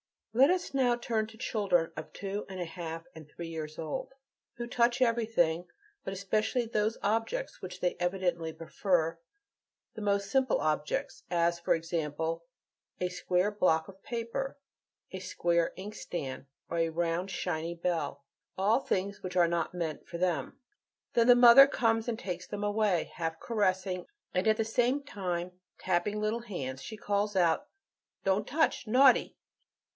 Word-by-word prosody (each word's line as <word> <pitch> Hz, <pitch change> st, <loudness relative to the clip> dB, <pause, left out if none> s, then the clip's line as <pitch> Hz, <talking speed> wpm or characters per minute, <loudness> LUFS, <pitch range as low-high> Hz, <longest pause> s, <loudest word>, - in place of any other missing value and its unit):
Let 265 Hz, +5 st, +6 dB
us 365 Hz, -4 st, 0 dB
now 255 Hz, -3 st, +3 dB
turn 225 Hz, -2 st, -1 dB
to 220 Hz, 0 st, -14 dB
children 200 Hz, -8 st, +1 dB
of -, -, -6 dB
two 200 Hz, +1 st, -4 dB
and 190 Hz, -1 st, -6 dB
a 175 Hz, -, -2 dB
half 165 Hz, -1 st, -6 dB
and 155 Hz, -2 st, -12 dB
three 170 Hz, +2 st, -7 dB
years 155 Hz, -2 st, -6 dB
old, 160 Hz, -, -4 dB, 0.4 s
who 240 Hz, -, -4 dB
touch 240 Hz, 0 st, +2 dB
everything, 220 Hz, -8 st, +2 dB, 0.4 s
but 190 Hz, -, -3 dB
especially 215 Hz, +5 st, 0 dB
those 220 Hz, 0 st, 0 dB
objects 225 Hz, -, -1 dB
which -, -, -7 dB
they 180 Hz, -, 0 dB
evidently 175 Hz, -3 st, -1 dB
prefer, 165 Hz, -1 st, 0 dB, 0.7 s
the 220 Hz, -, -7 dB
most 200 Hz, -1 st, 0 dB
simple 265 Hz, -3 st, +3 dB
objects, 150 Hz, -1 st, -1 dB
as, 170 Hz, 0 st, +2 dB
for 170 Hz, -, +2 dB
example, 165 Hz, 0 st, -2 dB, 0.5 s
a 180 Hz, -, 0 dB
square 180 Hz, +2 st, +1 dB
block 180 Hz, -5 st, +2 dB
of 190 Hz, 0 st, -14 dB
paper, 235 Hz, +4 st, -3 dB, 0.5 s
a 190 Hz, -, -5 dB
square 170 Hz, -2 st, +1 dB
inkstand, 180 Hz, -9 st, -5 dB, 0.2 s
or 170 Hz, -, -1 dB
a 165 Hz, 0 st, +2 dB
round, 170 Hz, +3 st, -1 dB
shiny 170 Hz, -2 st, -2 dB
bell. 170 Hz, -5 st, -2 dB, 0.3 s
All 210 Hz, +6 st, +3 dB
things 200 Hz, -5 st, -2 dB
which 185 Hz, -1 st, -6 dB
"are 175 Hz, -2 st, +5 dB
not 170 Hz, +1 st, -1 dB
meant 165 Hz, -4 st, -4 dB
for 170 Hz, -, -5 dB
them." 170 Hz, -6 st, -1 dB, 0.6 s
Then 235 Hz, 0 st, +4 dB
the 245 Hz, -, +9 dB
mother 245 Hz, +3 st, +10 dB
comes 225 Hz, -3 st, +1 dB
and 235 Hz, -2 st, -1 dB
takes 180 Hz, -4 st, -5 dB
them 205 Hz, 0 st, -4 dB
away; 205 Hz, -4 st, +1 dB
half 165 Hz, -2 st, -3 dB
caressing, 190 Hz, -4 st, 0 dB, 0.3 s
and 185 Hz, +3 st, +1 dB
at 215 Hz, 0 st, +4 dB
the 225 Hz, -, +1 dB
same 245 Hz, +5 st, +1 dB
time 180 Hz, -8 st, -3 dB, 0.3 s
tapping 185 Hz, +3 st, 0 dB
the 210 Hz, -, -2 dB
little 215 Hz, +2 st, 0 dB
hands, 135 Hz, -, -5 dB
she 220 Hz, +9 st, -7 dB
calls 205 Hz, 0 st, 0 dB
out, 180 Hz, -, +2 dB, 0.6 s
"Don't 195 Hz, +2 st, +1 dB
touch! 295 Hz, -4 st, +1 dB
naughty!" 255 Hz, +3 st, +5 dB
190 Hz, 160 wpm, -31 LUFS, 170-225 Hz, 0.7 s, mother